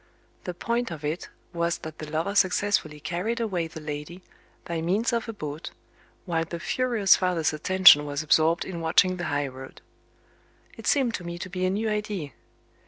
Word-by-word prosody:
The 180 Hz, -, -4 dB
point 235 Hz, +5 st, -1 dB
of 155 Hz, -3 st, -7 dB
it 155 Hz, +4 st, -3 dB, 0.2 s
was 170 Hz, 0 st, 0 dB
that 160 Hz, 0 st, -9 dB
the 155 Hz, -, -7 dB
lover 160 Hz, +6 st, -1 dB
successfully 185 Hz, -5 st, +1 dB
carried 185 Hz, -, -2 dB
away 185 Hz, -8 st, -1 dB
the 160 Hz, 0 st, -9 dB
lady, 150 Hz, +4 st, -7 dB, 0.4 s
by 170 Hz, -1 st, -3 dB
means 200 Hz, +9 st, 0 dB
of 230 Hz, 0 st, -1 dB
a -, -, -1 dB
boat, 155 Hz, -5 st, -6 dB, 0.6 s
while 165 Hz, -3 st, 0 dB
the 170 Hz, +1 st, -6 dB
furious 230 Hz, -2 st, +3 dB
father's 175 Hz, -4 st, 0 dB
attention 175 Hz, -1 st, +7 dB
was 145 Hz, +1 st, -3 dB
absorbed 160 Hz, +2 st, +3 dB
in 170 Hz, -3 st, -6 dB
watching 180 Hz, +3 st, +3 dB
the 175 Hz, -, -4 dB
high 145 Hz, -2 st, -1 dB
road. 130 Hz, 0 st, -10 dB, 1.0 s
It -, -, -8 dB
seemed 265 Hz, -6 st, +2 dB
to 180 Hz, -, -4 dB
me 170 Hz, 0 st, -6 dB
to 185 Hz, -, -6 dB
be 185 Hz, 0 st, -1 dB
a -, -, +1 dB
new 210 Hz, +4 st, -1 dB
idea. 210 Hz, -8 st, -3 dB
175 Hz, 180 wpm, -26 LUFS, 155-200 Hz, 1.0 s, attention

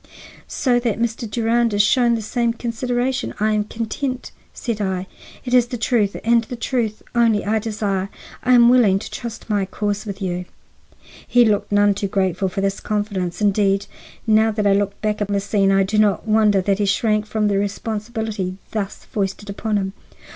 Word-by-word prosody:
"So 245 Hz, -3 st, +1 dB
that 235 Hz, -4 st, -1 dB
Mr. 230 Hz, 0 st, -2 dB
Durand 230 Hz, 0 st, +1 dB
is 205 Hz, -, +4 dB
shown 240 Hz, +2 st, +3 dB
the 225 Hz, -, -4 dB
same 235 Hz, +2 st, 0 dB
consideration, 245 Hz, +3 st, -2 dB
I 215 Hz, +1 st, +2 dB
am 210 Hz, -1 st, +1 dB
content," 250 Hz, +4 st, -4 dB, 0.2 s
said 230 Hz, -4 st, -4 dB
I. 190 Hz, -2 st, -1 dB, 0.4 s
"It 245 Hz, -, -3 dB
is 245 Hz, -1 st, +5 dB
the 245 Hz, -, -4 dB
truth 225 Hz, -4 st, +1 dB
and 235 Hz, 0 st, +3 dB
the 245 Hz, -, -6 dB
truth 230 Hz, -2 st, -2 dB
only 230 Hz, -3 st, +2 dB
I 220 Hz, +2 st, +1 dB
desire. 205 Hz, -3 st, -2 dB, 0.3 s
I 255 Hz, -, +3 dB
am 240 Hz, -1 st, +7 dB
willing 240 Hz, -6 st, +5 dB
to 195 Hz, -, -7 dB
trust 235 Hz, -2 st, -7 dB
my 205 Hz, -3 st, +1 dB
cause 205 Hz, +2 st, -3 dB
with 200 Hz, -1 st, -5 dB
you." 180 Hz, -2 st, -3 dB, 0.8 s
He 245 Hz, -1 st, +5 dB
looked 205 Hz, -2 st, +1 dB
none 205 Hz, 0 st, +4 dB
too 200 Hz, 0 st, -2 dB
grateful 190 Hz, -1 st, 0 dB
for 195 Hz, +2 st, -3 dB
this 195 Hz, 0 st, -1 dB
confidence. 205 Hz, -4 st, -2 dB
Indeed, 200 Hz, -1 st, +2 dB, 0.4 s
now 220 Hz, 0 st, +4 dB
that 210 Hz, -1 st, -1 dB
I 200 Hz, -, +5 dB
look 200 Hz, 0 st, 0 dB
back 210 Hz, 0 st, -1 dB
on 205 Hz, -, 0 dB
this 200 Hz, -1 st, -1 dB
scene, 195 Hz, -2 st, +2 dB
I 195 Hz, 0 st, +4 dB
do 210 Hz, +3 st, 0 dB
not 210 Hz, +1 st, +2 dB
wonder 215 Hz, -2 st, +4 dB
that 195 Hz, +1 st, 0 dB
he 205 Hz, -, +2 dB
shrank 215 Hz, +1 st, +1 dB
from 215 Hz, 0 st, 0 dB
the 200 Hz, -1 st, +1 dB
responsibility 210 Hz, -1 st, -3 dB
thus 210 Hz, -2 st, -4 dB
foisted 200 Hz, 0 st, -3 dB
upon 210 Hz, +1 st, -1 dB
him. 190 Hz, -1 st, -2 dB
210 Hz, 190 wpm, -21 LUFS, 200-230 Hz, 0.8 s, am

